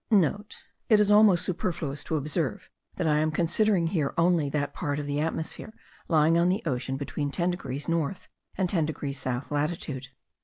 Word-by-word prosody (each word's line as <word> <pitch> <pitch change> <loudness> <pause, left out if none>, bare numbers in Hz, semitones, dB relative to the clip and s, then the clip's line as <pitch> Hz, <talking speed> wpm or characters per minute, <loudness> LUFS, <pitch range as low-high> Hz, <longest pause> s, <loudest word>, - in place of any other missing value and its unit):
(* - - -50 0.8
It 215 -2 +6
is 210 0 +3
almost 205 -4 +6
superfluous 165 -5 -3
to 160 - -1
observe 150 -1 -2 0.2
that 180 - -2
I 150 -1 +3
am 155 +1 +2
considering 170 +4 +2
here 165 -5 -1
only 165 -3 +3
that 145 0 -2
part 145 -5 -2
of 150 - -3
the 145 0 -2
atmosphere 160 +7 -3 0.3
lying 160 0 +4
on 175 +1 +3
the 190 +4 0
ocean 135 -2 -2
between 145 +1 -3
10 175 +4 0
degrees 145 -5 -5
north 165 +1 -1 0.3
and 190 -1 +1
10 165 -4 +1
degrees 140 -3 -4
south 130 +2 -3
latitude. 145 -2 -2
160 Hz, 180 wpm, -27 LUFS, 145-175 Hz, 0.8 s, It